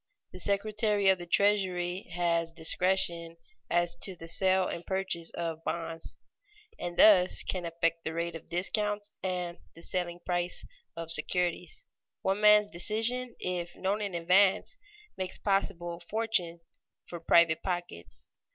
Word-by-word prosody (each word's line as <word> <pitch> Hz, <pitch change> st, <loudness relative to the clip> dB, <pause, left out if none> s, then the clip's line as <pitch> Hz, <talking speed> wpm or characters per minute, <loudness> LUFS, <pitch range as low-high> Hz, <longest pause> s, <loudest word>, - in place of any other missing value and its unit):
The 185 Hz, -, -10 dB
Secretary 205 Hz, +1 st, +1 dB
of 190 Hz, -1 st, +3 dB
the 175 Hz, -, -8 dB
Treasury 185 Hz, -2 st, +1 dB
has 170 Hz, -1 st, 0 dB
discretion 170 Hz, 0 st, +1 dB, 0.3 s
as 175 Hz, 0 st, +1 dB
to 190 Hz, -, -2 dB
the 165 Hz, -1 st, -10 dB
sale 185 Hz, +2 st, +3 dB
and 170 Hz, -, -5 dB
purchase 190 Hz, -3 st, -2 dB
of 165 Hz, -1 st, -4 dB
bonds, 165 Hz, -1 st, -4 dB, 0.6 s
and 175 Hz, 0 st, -5 dB
thus 185 Hz, -4 st, +6 dB
can 180 Hz, -2 st, -3 dB
affect 165 Hz, 0 st, -1 dB
the 160 Hz, -, -4 dB
rate 170 Hz, 0 st, -2 dB
of 165 Hz, -, -10 dB
discount 205 Hz, +4 st, 0 dB, 0.2 s
and 180 Hz, -2 st, -3 dB, 0.2 s
the 165 Hz, -, -11 dB
selling 175 Hz, -1 st, -3 dB
price 175 Hz, 0 st, -1 dB, 0.3 s
of 165 Hz, -1 st, -5 dB
securities. 175 Hz, 0 st, -1 dB, 0.4 s
One 195 Hz, +2 st, 0 dB
man's 210 Hz, 0 st, +6 dB
decision, 225 Hz, +7 st, -1 dB
if 175 Hz, -1 st, -4 dB
known 200 Hz, +3 st, -1 dB
in 200 Hz, -3 st, -3 dB
advance, 185 Hz, -, +3 dB, 0.4 s
makes 185 Hz, -1 st, -3 dB
possible 175 Hz, -4 st, -1 dB
fortunes 200 Hz, -7 st, -1 dB, 0.5 s
for 170 Hz, -, -7 dB
private 165 Hz, -1 st, +4 dB
pockets. 85 Hz, -, -5 dB
180 Hz, 135 wpm, -30 LUFS, 170-195 Hz, 0.6 s, thus